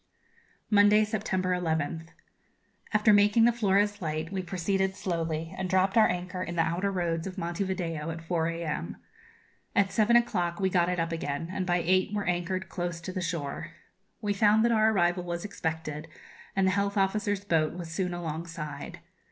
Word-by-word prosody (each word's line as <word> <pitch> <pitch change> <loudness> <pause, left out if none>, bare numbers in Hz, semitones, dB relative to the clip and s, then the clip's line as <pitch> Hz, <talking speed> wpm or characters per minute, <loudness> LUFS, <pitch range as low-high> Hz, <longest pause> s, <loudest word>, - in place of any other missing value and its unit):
Monday, 210 +1 +6
September 195 -4 -1
11th. 165 -2 -1 0.8
After 215 0 +4
making 205 +3 +5
the 240 - +6
Flores 205 -2 +1
light 155 0 -3
we 190 -1 -2
proceeded 190 +2 -1
slowly, 165 -3 -3
and 190 -1 -3
dropped 190 +3 +2
our 220 -1 +6
anchor 180 +1 -3
in 175 -1 -4
the 165 - +3
outer 175 +5 0
roads 170 -2 -1
of 190 +1 -7
Monte 175 +2 -2
Video 165 -5 -3
at 165 0 -4
4 165 -1 0
a.m. 165 - -3 0.8
At 195 -1 +3
seven 225 +1 +3
o'clock 175 -7 +2
we 190 -1 +1
got 175 -1 +3
it 180 -1 -1
up 165 0 -1
again, 165 0 -3
and 185 -1 -3
by 175 -1 +1
eight 185 +2 +2
were 205 - -1
anchored 180 +2 -1
close 175 -2 -4
to 185 - -6
the 185 - -3
shore. 165 -5 -4 0.5
We 205 -2 0
found 215 +2 +4
that 235 - +3
our 220 -1 +4
arrival 175 -2 +2
was 175 +1 -4
expected, 160 -5 -4 0.5
and 195 -1 +3
the 190 - +3
health 200 +1 0
officers' 205 +1 0
boat 160 -5 +1
was 170 -2 -7
soon 180 +1 -1
alongside. 160 -3 -6
180 Hz, 175 wpm, -28 LUFS, 165-200 Hz, 0.8 s, Monday